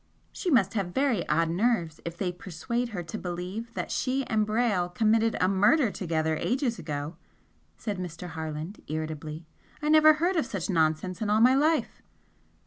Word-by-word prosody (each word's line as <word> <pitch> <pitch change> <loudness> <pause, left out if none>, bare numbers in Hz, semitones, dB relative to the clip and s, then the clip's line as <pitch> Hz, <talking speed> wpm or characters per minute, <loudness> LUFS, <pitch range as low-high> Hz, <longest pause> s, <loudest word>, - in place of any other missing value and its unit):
"She 370 - -3
must 215 - +3
have 195 -5 -2
very 260 -9 +1
odd 165 +1 +2
nerves 175 -5 0
if 170 0 -5
they 180 -2 -1
persuade 190 +8 -4
her 190 -6 -5
to 165 +6 -6
believe 180 +6 -5
that - - -3
she 265 +1 0
and 215 -2 +1
Brayle 215 -5 +1
committed 220 +4 +2
a 185 - +3
murder 210 +7 +3
together 160 -4 -1
ages 250 - -1
ago" 150 +1 -5 0.6
said 205 -4 -4
Mr. 180 0 -6
Harland, 160 +3 -6
irritably; 155 0 -5 0.3
"I 300 0 -2
never 310 0 +7
heard 345 +4 0
of 315 - +1
such 195 -1 -3
nonsense 165 +3 0
in 215 - -1
all 210 +1 +3
my 250 +3 +6
life!" 310 +4 +1
195 Hz, 170 wpm, -27 LUFS, 165-235 Hz, 0.6 s, never